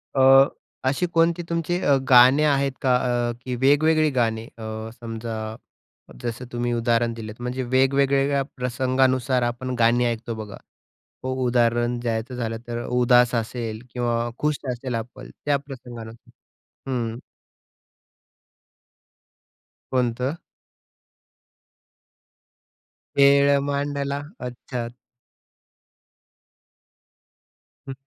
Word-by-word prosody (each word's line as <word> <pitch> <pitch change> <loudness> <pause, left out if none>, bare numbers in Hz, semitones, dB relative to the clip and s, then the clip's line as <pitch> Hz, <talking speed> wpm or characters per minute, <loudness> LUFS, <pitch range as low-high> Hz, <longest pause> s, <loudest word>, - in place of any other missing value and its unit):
अ, 135 0 +7 0.4
अशी 140 +7 +1
कोणती 165 +1 +3
तुमची 170 +1 -1
अ, 140 - +4
गाणे 130 +3 +7
आहेत 140 -2 +2
का 130 -2 +3 0.3
अ, - - 0
की 125 -1 -2
वेगवेगळी 155 +4 +3
गाणे 115 -2 +1
अ, 110 0 -6
समजा 110 -1 -5 0.7
जसं 120 +2 -4
तुम्ही 120 0 -1
उदाहरण 115 0 +1
दिलंत. 110 -2 -8
म्हणजे 125 +1 -3
वेगवेगळ्या 135 +2 +2 0.2
प्रसंगानुसार 130 0 +1
आपण 120 +2 -3
गाणी 120 +2 +4
ऐकतो 115 0 -2
बघा. 105 -2 -8 0.7
हो. 130 0 -2
उदाहरण 120 0 +2
द्यायचं 120 +1 -3
झालं 115 -2 -3
तर 120 0 -4
उदास 125 0 +4
असेल 115 -1 -3
किंवा 120 -1 -1
खुश 150 0 +1 0.2
असेल 125 0 -4
आपण 120 +3 -7 0.2
त्या 145 -1 +3
प्रसंगानुसार. 120 -5 -11 0.6
हं. 115 -2 -2 2.7
कोणतं? 125 +1 0 2.8
खेळ 140 0 +6
मांडला. 140 0 -2 0.2
अच्छा. 125 -1 -5 3.0
हं. 135 - -4
125 Hz, 95 wpm, -23 LUFS, 115-135 Hz, 3.0 s, अ